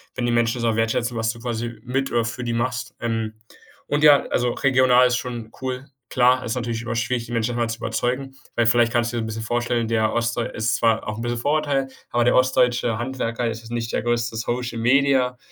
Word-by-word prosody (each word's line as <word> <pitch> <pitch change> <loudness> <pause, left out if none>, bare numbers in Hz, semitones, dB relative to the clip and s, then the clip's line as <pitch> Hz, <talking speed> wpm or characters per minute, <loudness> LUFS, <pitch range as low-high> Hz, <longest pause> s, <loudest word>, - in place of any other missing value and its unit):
wenn 125 - -1
die 120 - +1
Menschen 120 0 +1
das - - -3
auch - - -2
wertschätzen, 115 +1 0
was 115 0 +1
du 115 - -13
quasi 120 -1 -4
mit 135 +2 -1
äh, 120 -1 +2
für 120 +2 -4
die 120 - -1
machst. 125 +1 -2
Ähm, 115 -2 -2 0.5
und 145 +1 0
ja, 145 -2 +8
also 120 0 +1
regional 125 -1 +4
ist 125 0 +1
schon 120 -3 -6
cool. 130 +1 -4 0.2
Klar, 125 0 +3
ist 115 - -2
natürlich 115 -2 -3
immer 115 -1 -3
schwierig, 115 +1 -1
die 120 - -11
Menschen 115 +1 -1
davon 120 -1 0
zu 115 - -3
überzeugen, 135 +3 -2 0.2
weil, 120 -1 +2
vielleicht 120 +1 +3
kannst 120 0 +1
du 120 - -2
dir 115 - -1
'n - - -3
bisschen 110 0 -5
vorstellen, 120 0 0
der 110 -1 +1
ostdeu 120 0 0
ist 110 0 -1
zwar 115 -1 +1
auch 105 +1 -4
'n - - -5
bisschen 120 0 -2
Vorurteil, 145 0 +1 0.2
aber 120 0 +2
der 120 - +3
ostdeutsche 125 -2 +2
Handwerker 120 -2 -2
ist 115 0 -5
jetzt 115 0 -12
nicht 115 -1 -3
der - - 0
größte 120 -1 0
Social-Media 125 +2 +1
120 Hz, 225 wpm, -23 LUFS, 115-125 Hz, 0.5 s, ja